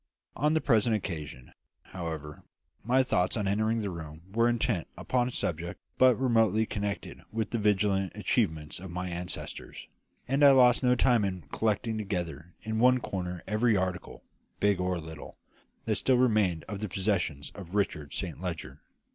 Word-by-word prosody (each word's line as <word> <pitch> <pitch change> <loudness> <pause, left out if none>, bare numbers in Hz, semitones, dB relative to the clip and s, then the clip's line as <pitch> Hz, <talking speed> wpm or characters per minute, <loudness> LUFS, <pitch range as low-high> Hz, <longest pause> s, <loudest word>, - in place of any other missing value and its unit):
On 150 +2 +2
the 160 - +2
present 115 -3 +3
occasion, 75 - -6 0.3
however, 80 -5 -6 0.4
my 130 +4 +3
thoughts 95 -5 +1
on 105 -2 -1
entering 110 +3 +1
the 100 -2 -3
room 80 -1 -8
were 115 +1 +3
intent 120 -6 0
upon 125 -1 0
a - - -4
subject 85 -6 -3 0.2
but 130 -3 +6
remotely 115 -4 +3
connected 105 -1 -4
with 110 0 -2
the 115 - 0
valiant 100 -3 +2
achievements 80 -1 0
of 95 +1 -8
my 90 +1 -4
ancestors; 90 +1 -6 0.4
and 135 +3 +2
I 140 -1 +9
lost 125 -2 +6
no 125 -1 +4
time 120 -3 +3
in 95 -3 -2
collecting 110 0 0
together 90 -5 -4
in 110 0 -2
one 125 +2 +5
corner 90 -6 -4
every 110 +1 +2
article, 95 -1 -3 0.4
big 100 -2 +2
or 90 -1 0
little, 80 -1 -9 0.5
that - - +1
still 130 -1 +2
remained 105 -9 +2
of 100 - -6
the 105 -1 -4
possessions 90 -7 -1
of 95 -1 -9
Richard 75 -8 -1
Saint - - -5
Leger. 85 -4 -5
100 Hz, 165 wpm, -29 LUFS, 90-115 Hz, 0.5 s, I